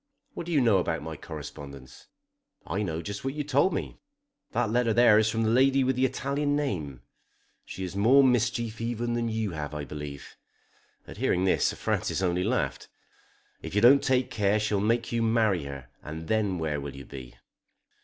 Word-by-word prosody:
"What 170 - -6
do - - -4
you 150 -4 +3
know 110 -6 +4
about 85 -2 -2
my 80 0 -6
correspondence?" 70 -4 -10 0.6
"I 95 +5 -2
know 85 -4 -3
just 100 +4 -6
what 135 +1 -3
you 150 - -2
told 145 +6 +2
me. - - -4 0.5
That 120 -2 0
letter 120 -1 +2
there 115 -3 +6
is 110 0 +2
from 115 +1 0
the 110 - +2
lady 135 +2 +4
with 130 0 +1
the 130 +1 +2
Italian 140 +3 -1
name. 80 - -3 0.6
She 95 - -7
has 95 +1 -5
more 125 +8 +5
mischief 120 -2 +1
even 120 0 -2
than 120 -1 -1
you 110 -2 -2
have, 75 -2 -5
I 75 -1 -4
believe." 75 -2 -8 0.7
At - - -11
hearing 90 +1 +1
this 95 - +3
Sir - - -2
Francis 95 - -1
only 90 0 +1
laughed. 125 +5 -1 0.7
"If - - -7
you 105 - +3
don't 135 +4 +7
take 130 -2 +1
care 105 0 +1
she'll 105 -1 0
make 115 +2 0
you 115 -1 0
marry 110 -8 +2
her, 70 -2 -8
and 80 +2 -7
then 105 -4 0
where 75 -3 -2
will 70 0 -7
you 70 -1 -9
be?" 65 -3 -10
110 Hz, 195 wpm, -27 LUFS, 80-120 Hz, 0.7 s, don't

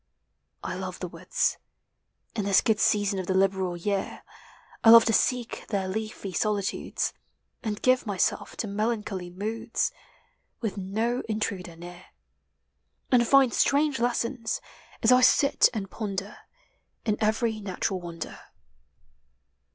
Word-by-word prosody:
I - - -3
love - - -5
the - - -4
woods, - - -1 0.8
In 210 - -1
this 200 -1 +4
good 220 -2 +1
season 205 -2 +2
of 185 - -4
the 190 - 0
liberal 190 -2 +1
year; 195 +3 -3 0.6
I 225 - +7
love 230 0 +10
to 225 - +2
seek 245 -1 0
their 195 -3 -1
leafy 210 -1 -4
solitudes, 205 +1 -1 0.5
And 210 -3 -4
give 255 -2 +3
myself 195 -3 -1
to 220 - -2
melancholy 210 -3 -2
moods, 220 +5 -2 0.7
With 220 -5 -3
no 220 +6 -1
intruder 200 -5 -3
near, 175 +1 -11 1.1
And 240 -2 +4
find 270 -2 +5
strange 285 -1 +2
lessons, 240 - -1 0.4
as 225 - +5
I 250 0 +6
sit 275 +3 +5
and 205 -5 -5
ponder, 200 -1 -4 0.7
In 215 -2 +2
every 220 +1 +1
natural 190 -1 -3
wonder. 170 -2 -7
215 Hz, 130 wpm, -27 LUFS, 195-230 Hz, 1.1 s, love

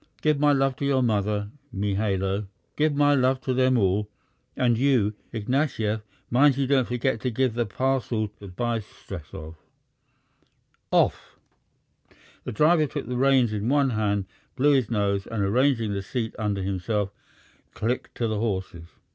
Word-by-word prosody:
Give 155 -2 +3
my 145 0 +4
love 135 -1 +2
to 145 - -2
your 135 -2 +2
mother, 105 -2 0 0.2
Mihailo. 100 -1 -1 0.3
Give 150 -1 +2
my 145 0 +4
love 130 -1 +2
to 130 - -1
them 130 0 +3
all. 100 0 +1 0.5
And 120 -2 +3
you, 120 -4 +2 0.2
Ignatyev, 115 -2 -1 0.3
mind 135 +2 +5
you 140 - +1
don't 130 -2 +2
forget 125 0 -1
to 130 - 0
give 125 0 0
the 120 -1 -1
parcel 120 -2 -1
to 100 - -10
Bystretsov.... 90 -7 -6 1.3
Off!" - - +1 1.1
The - - -3
driver 155 +5 +4
took 130 - -5
the 125 - -3
reins 130 -3 +3
in 105 +2 -1
one 140 -1 +3
hand, 105 -3 0 0.3
blew 145 +2 +4
his 130 -5 +2
nose, 100 -3 0
and, 110 -3 -2
arranging 115 0 +2
the 100 - -2
seat 115 +3 -3
under 105 -3 -1
himself, 100 +2 -1 0.6
clicked 120 +4 -2
to 115 - -1
the 110 -1 -1
horses. 95 -6 -3
115 Hz, 150 wpm, -25 LUFS, 105-130 Hz, 1.3 s, mind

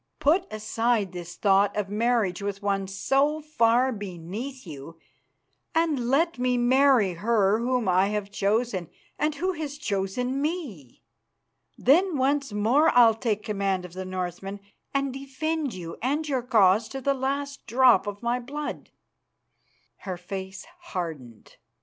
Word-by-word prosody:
Put 345 +6 +2
aside 215 -1 0
this 175 -1 -8
thought 200 0 +3
of 205 -2 -1
marriage 215 -4 +1
with 200 0 -4
one 195 -1 0
so 275 +10 +1
far 255 -4 +2
beneath 205 +6 -6
you, 155 0 -9 0.8
and 300 -7 +1
let 320 +2 +2
me 250 0 +1
marry 250 -5 +4
her 205 +2 +2
whom 245 -2 0
I 185 +1 +4
have 205 -1 -3
chosen, 200 -3 0 0.3
and 300 +1 0
who 370 +6 -1
has 300 -4 -5
chosen 245 +4 -2
me. 285 - -5 0.7
Then 335 +5 +3
once 275 0 +1
more 230 +10 +3
I'll 230 -2 +8
take 220 -2 -2
command 195 -4 -1
of 175 - -11
the 185 +1 -5
Northmen 185 +2 -5 0.3
and 275 -1 -1
defend 275 +1 -3
you 170 -2 -8
and 290 +6 -1
your 265 -3 0
cause 220 -3 +4
to 270 - -5
the 275 +1 +1
last 275 +1 -3
drop 250 -2 +4
of 205 +2 -6
my 240 +1 0
blood." 285 +4 -6 1.1
Her 185 -2 -6
face 190 +1 -7
hardened. 160 - -7
230 Hz, 140 wpm, -26 LUFS, 195-275 Hz, 1.1 s, I'll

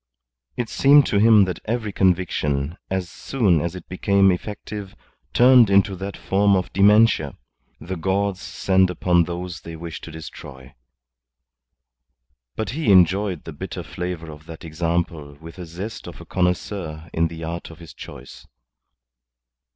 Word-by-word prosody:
It 120 - -2
seemed 140 +4 +5
to 100 - +1
him 110 -2 +6
that 90 - -4
every 110 -2 -2
conviction, 85 -5 0
as 95 -2 -2
soon 95 - 0
as 85 +2 -3
it 90 - -10
became 100 +1 +3
effective, 100 +1 -6 0.4
turned 125 -3 +6
into 100 0 +3
that 95 +2 -6
form 100 +1 +2
of 90 -2 -2
dementia 100 -6 +4 0.4
the 90 +4 -6
gods 95 +2 -1
send 95 -1 +1
upon 90 -1 +2
those 85 -1 -6
they 85 0 -9
wish 80 0 -8
to - - -9
destroy. 70 -4 -11 1.8
But 110 -1 -3
he 140 -5 0
enjoyed 95 -1 +3
the - - -8
bitter - - -6
flavour 90 -3 -6
of 75 0 -14
that 80 +1 -10
example 80 -2 -3
with 80 +2 -12
the 90 -2 -8
zest 95 +7 -7
of - - -10
a - - -11
connoisseur 90 -3 -2
in 80 0 +2
the 80 0 -9
art 85 +1 -5
of 80 - -12
his 85 -2 -12
choice. - - -12
90 Hz, 150 wpm, -22 LUFS, 80-100 Hz, 1.8 s, him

